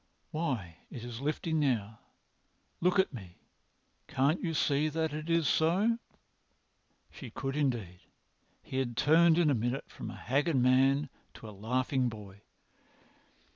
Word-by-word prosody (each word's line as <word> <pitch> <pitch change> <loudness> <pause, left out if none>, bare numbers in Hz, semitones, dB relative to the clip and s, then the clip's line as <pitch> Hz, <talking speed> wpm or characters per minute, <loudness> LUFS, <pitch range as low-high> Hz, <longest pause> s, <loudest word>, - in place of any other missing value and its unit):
Why, 125 - -3
it 120 - -8
is 120 0 -7
lifting 155 +2 -1
now. 110 -7 0 0.8
Look 180 +3 +2
at 190 -5 +2
me! 95 -7 -10 0.7
Can't 140 +6 +1
you 165 -3 -1
see 150 +1 +2
that 160 0 -1
it 155 +2 -5
is 165 -3 +2
so?" 195 +9 +2 1.1
She - - -9
could 135 0 -4
indeed. 120 -12 -1 0.6
He 130 - -5
had 120 -3 -2
turned 160 +4 +5
in 165 -4 +4
a - - +3
minute 120 +3 -2
from - - -7
a - - -8
haggard 145 +6 0
man 135 +3 +3 0.3
to 110 - -10
a - - -8
laughing 125 +5 0
boy. 100 -3 -11
135 Hz, 140 wpm, -31 LUFS, 120-160 Hz, 1.1 s, turned